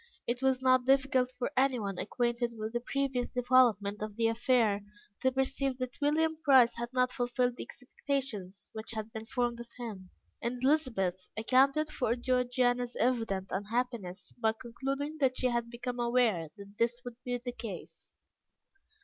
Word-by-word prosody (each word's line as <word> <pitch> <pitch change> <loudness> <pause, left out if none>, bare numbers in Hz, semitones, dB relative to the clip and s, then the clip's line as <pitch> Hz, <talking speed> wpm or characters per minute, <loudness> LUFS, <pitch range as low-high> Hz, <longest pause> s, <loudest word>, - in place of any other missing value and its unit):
It 240 +1 -2
was 265 -1 +2
not 255 -1 +5
difficult 265 -2 +3
for 245 - -2
anyone 245 -8 +1
acquainted 240 -1 -1
with 220 +1 -4
the 240 - 0
previous 265 0 -1
development 240 -5 +3
of 215 -1 -4
the 230 +1 +1
affair, 225 -3 +2 0.4
to 260 - +3
perceive 265 0 0
that 255 +1 -5
William 315 +2 +2
Price 260 -4 +6
had 235 0 -3
not 250 -1 +2
fulfilled 245 0 0
the - - -7
expectations 250 -8 -4
which 220 +1 -5
had 220 0 -5
been 220 0 -6
formed 240 -1 -1
of 235 - -8
him, 210 -7 -7 0.3
and 240 +1 -2
Elizabeth 230 - +1
accounted 270 +7 +3
for 235 -2 0
Georgiana's 245 -1 +1
evident 225 -6 0
unhappiness 205 -3 -3
by 220 -1 +2
concluding 275 +5 -4
that 260 -2 +2
she 255 - +2
had 235 -1 -1
become 245 +1 -5
aware 235 -9 +2
that 200 +1 -13
this 240 +1 +1
would 245 -1 -7
be 245 -1 -1
the 245 +1 -5
case. 220 -7 -8
245 Hz, 160 wpm, -31 LUFS, 225-255 Hz, 0.4 s, Price